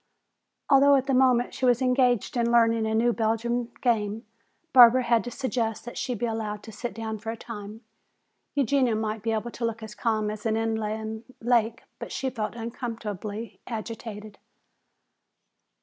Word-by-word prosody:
Although 280 Hz, +1 st, +6 dB
at 265 Hz, -1 st, +1 dB
the 270 Hz, -, 0 dB
moment 255 Hz, -2 st, +3 dB
she -, -, -8 dB
was 245 Hz, -2 st, +4 dB
engaged 250 Hz, -3 st, +2 dB
in 235 Hz, -1 st, +1 dB
learning 230 Hz, -1 st, +4 dB
a 220 Hz, -, 0 dB
new 235 Hz, +2 st, +3 dB
Belgian 235 Hz, +2 st, -1 dB
game, 225 Hz, -2 st, 0 dB, 0.5 s
Barbara 250 Hz, 0 st, +8 dB
had 235 Hz, -1 st, +2 dB
to -, -, -3 dB
suggest 235 Hz, -4 st, -2 dB
that 240 Hz, -, -8 dB
she 250 Hz, -, -2 dB
be 235 Hz, -, -2 dB
allowed 215 Hz, -2 st, -3 dB
to 225 Hz, -, -9 dB
sit 225 Hz, +1 st, -6 dB
down 220 Hz, -1 st, -4 dB
for 220 Hz, +2 st, -6 dB
a 225 Hz, -, -4 dB
time. 215 Hz, -1 st, -8 dB, 0.7 s
Eugenia 265 Hz, -3 st, +2 dB
might 215 Hz, 0 st, -2 dB
be 225 Hz, +2 st, -1 dB
able 225 Hz, +2 st, -2 dB
to 235 Hz, -, -7 dB
look 230 Hz, -1 st, -2 dB
as 215 Hz, -1 st, -8 dB
calm 215 Hz, -2 st, 0 dB
as 215 Hz, -1 st, -7 dB
an 220 Hz, 0 st, +1 dB
inland 220 Hz, 0 st, -2 dB, 0.2 s
lake, 235 Hz, 0 st, +1 dB, 0.2 s
but -, -, -7 dB
she 265 Hz, -1 st, -2 dB
felt 220 Hz, -3 st, -4 dB
uncomfortably 225 Hz, -3 st, -5 dB
agitated. 215 Hz, -2 st, -7 dB
230 Hz, 165 wpm, -26 LUFS, 220-245 Hz, 0.7 s, Barbara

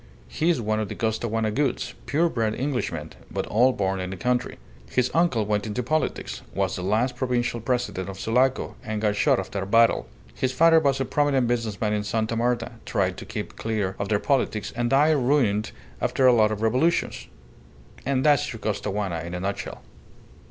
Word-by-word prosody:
He's 165 Hz, -3 st, +1 dB
one 110 Hz, -1 st, 0 dB
of 110 Hz, -, -2 dB
the -, -, -5 dB
Costaguana 110 Hz, -1 st, -1 dB
Goulds, 135 Hz, +2 st, -1 dB
pure 150 Hz, +7 st, +2 dB
bred 115 Hz, -7 st, -1 dB
Englishmen, 120 Hz, -, -2 dB, 0.2 s
but -, -, -3 dB
all 125 Hz, +5 st, +4 dB
born 95 Hz, -4 st, -1 dB
in 90 Hz, 0 st, -3 dB
the 95 Hz, -, -6 dB
country. 125 Hz, +5 st, -1 dB, 0.3 s
His 125 Hz, -1 st, +1 dB
uncle 165 Hz, -11 st, +2 dB
went 105 Hz, +1 st, -1 dB
into 110 Hz, +4 st, -2 dB
politics, 155 Hz, +6 st, -2 dB
was -, -, 0 dB
the -, -, -4 dB
last 110 Hz, +7 st, +1 dB
Provincial 120 Hz, -2 st, -1 dB
President 120 Hz, -6 st, -2 dB
of 95 Hz, -1 st, -8 dB
Sulaco, 125 Hz, +3 st, +1 dB
and 110 Hz, -1 st, -3 dB
got 105 Hz, -1 st, +1 dB
shot -, -, +3 dB
after 95 Hz, +1 st, -4 dB
a 95 Hz, -, -4 dB
battle. 115 Hz, -, +4 dB, 0.3 s
His 130 Hz, -, -1 dB
father 165 Hz, +4 st, +6 dB
was 140 Hz, -3 st, +1 dB
a 135 Hz, -, 0 dB
prominent 140 Hz, -2 st, +2 dB
business 115 Hz, -4 st, -1 dB
man 105 Hz, -1 st, 0 dB
in 105 Hz, -1 st, 0 dB
Sta. 110 Hz, +2 st, -1 dB
Marta, 120 Hz, 0 st, 0 dB
tried -, -, 0 dB
to -, -, -8 dB
keep -, -, -6 dB
clear 105 Hz, -4 st, -2 dB
of 100 Hz, -, -2 dB
their 105 Hz, -, +3 dB
politics, 110 Hz, -5 st, 0 dB
and 120 Hz, 0 st, 0 dB
died 150 Hz, +4 st, +4 dB
ruined 120 Hz, -6 st, +2 dB, 0.3 s
after 130 Hz, -, +1 dB
a 125 Hz, -, +7 dB
lot 110 Hz, -2 st, +4 dB
of 110 Hz, 0 st, -3 dB
revolutions. 130 Hz, +10 st, +1 dB, 0.8 s
And 130 Hz, 0 st, 0 dB
that's 145 Hz, -3 st, +3 dB
your 115 Hz, -, -7 dB
Costaguana 100 Hz, -4 st, -2 dB
in 85 Hz, +2 st, -6 dB
a -, -, -3 dB
nutshell." 100 Hz, +2 st, -4 dB
115 Hz, 190 wpm, -25 LUFS, 105-130 Hz, 0.8 s, a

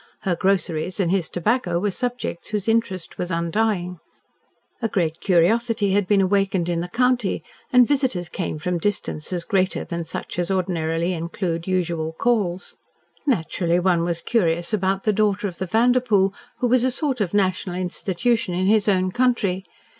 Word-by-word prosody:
Her 185 Hz, -3 st, 0 dB
groceries 185 Hz, -1 st, 0 dB
and 175 Hz, -3 st, +1 dB
his 190 Hz, -4 st, +1 dB
tobacco 180 Hz, -1 st, 0 dB
were 200 Hz, +3 st, 0 dB
subjects 245 Hz, -5 st, -4 dB
whose 210 Hz, -1 st, -3 dB
interest 225 Hz, -6 st, -1 dB
was 180 Hz, -, -2 dB
undying. 180 Hz, +1 st, -1 dB, 0.8 s
A 230 Hz, -, +1 dB
great 170 Hz, -6 st, -1 dB
curiosity 205 Hz, +4 st, +2 dB
had 200 Hz, -2 st, +2 dB
been 200 Hz, 0 st, +4 dB
awakened 195 Hz, -2 st, +1 dB
in 170 Hz, -1 st, 0 dB
the 175 Hz, -, -3 dB
county, 245 Hz, 0 st, +1 dB, 0.3 s
and 250 Hz, -2 st, +6 dB
visitors 260 Hz, -, 0 dB
came 175 Hz, -3 st, -4 dB
from 175 Hz, +2 st, -2 dB
distances 175 Hz, -3 st, -2 dB
greater 190 Hz, -1 st, 0 dB
than 170 Hz, -1 st, -4 dB
such 165 Hz, +2 st, -5 dB
as 175 Hz, -, 0 dB
ordinarily 175 Hz, -2 st, 0 dB
include 170 Hz, 0 st, -3 dB
usual 170 Hz, -3 st, -1 dB
calls. 195 Hz, -3 st, -1 dB, 0.5 s
Naturally, 175 Hz, -, +1 dB
one 180 Hz, -2 st, +2 dB
was 170 Hz, -1 st, -1 dB
curious 170 Hz, -4 st, +1 dB
about 195 Hz, -1 st, 0 dB
the 215 Hz, -, +2 dB
daughter 205 Hz, 0 st, +1 dB
of 180 Hz, -, -8 dB
the 190 Hz, -, -2 dB
Vanderpoel 225 Hz, -2 st, +3 dB, 0.2 s
who 250 Hz, -, 0 dB
was 245 Hz, 0 st, +3 dB
a 260 Hz, -, +3 dB
sort 265 Hz, -2 st, -1 dB
of 200 Hz, -1 st, -1 dB
national 185 Hz, -2 st, 0 dB
institution 185 Hz, +2 st, -1 dB
in 185 Hz, +1 st, 0 dB
his 210 Hz, +1 st, +3 dB
own 185 Hz, -1 st, +2 dB
country. 215 Hz, -6 st, +1 dB
190 Hz, 160 wpm, -23 LUFS, 175-215 Hz, 0.8 s, and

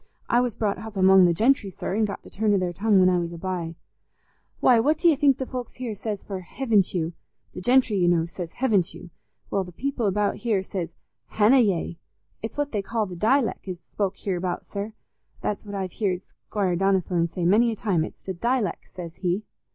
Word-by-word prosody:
I 240 Hz, -, +4 dB
was 245 Hz, -3 st, -1 dB
brought 205 Hz, -3 st, -1 dB
hup 220 Hz, -1 st, -8 dB
among 190 Hz, 0 st, +7 dB
the -, -, +3 dB
gentry, 225 Hz, 0 st, +3 dB
sir, 190 Hz, -, -4 dB
an' 220 Hz, 0 st, +2 dB
got 200 Hz, -, -5 dB
the -, -, -14 dB
turn 210 Hz, 0 st, +2 dB
o' -, -, +4 dB
their 180 Hz, -2 st, -1 dB
tongue 205 Hz, +2 st, +3 dB
when 185 Hz, -, +6 dB
I 180 Hz, -1 st, +3 dB
was 170 Hz, 0 st, -3 dB
a -, -, -7 dB
bye. 170 Hz, -2 st, -3 dB, 0.8 s
Why, 245 Hz, -3 st, +5 dB
what 295 Hz, +7 st, +3 dB
do 340 Hz, -, +3 dB
you 325 Hz, -, +6 dB
think 275 Hz, -2 st, +4 dB
the 265 Hz, -, -3 dB
folks 250 Hz, -2 st, -6 dB
here 250 Hz, -3 st, -4 dB
says 210 Hz, 0 st, -4 dB
for 195 Hz, -2 st, -5 dB
'hevn't 205 Hz, 0 st, +1 dB
you?'—the 170 Hz, +1 st, -6 dB
gentry, 245 Hz, -1 st, +3 dB
you 175 Hz, -2 st, +3 dB
know, 170 Hz, -2 st, +3 dB
says, 170 Hz, 0 st, -7 dB
'hevn't 215 Hz, -9 st, +1 dB
you'—well, 175 Hz, +3 st, -6 dB
the 180 Hz, -, -10 dB
people 255 Hz, -, -2 dB
about 205 Hz, +1 st, +1 dB
here 215 Hz, -5 st, 0 dB
says 185 Hz, -3 st, -5 dB, 0.4 s
'hanna 225 Hz, +5 st, +5 dB
yey.' 180 Hz, -6 st, +1 dB, 0.4 s
It's 225 Hz, -, -6 dB
what 290 Hz, 0 st, -1 dB
they 210 Hz, -, -1 dB
call 220 Hz, +2 st, -1 dB
the 185 Hz, -3 st, -7 dB
dileck 225 Hz, +4 st, +1 dB
as 185 Hz, -2 st, -4 dB
is -, -, -42 dB
spoke 195 Hz, -2 st, -1 dB
hereabout, 180 Hz, -2 st, -2 dB
sir. 205 Hz, +2 st, -5 dB, 0.5 s
That's 210 Hz, +1 st, -3 dB
what 200 Hz, -, -5 dB
I've 190 Hz, -2 st, -3 dB
heared 190 Hz, -3 st, -1 dB
Squire 195 Hz, -4 st, -2 dB
Donnithorne 185 Hz, -2 st, +2 dB
say 170 Hz, +1 st, -3 dB
many 225 Hz, +6 st, +4 dB
a -, -, -3 dB
time; 195 Hz, -7 st, 0 dB
it's -, -, -8 dB
the 190 Hz, -, -4 dB
dileck, 235 Hz, +2 st, -1 dB
says 170 Hz, -2 st, -9 dB
he." 185 Hz, +2 st, -1 dB
200 Hz, 215 wpm, -25 LUFS, 180-225 Hz, 0.8 s, among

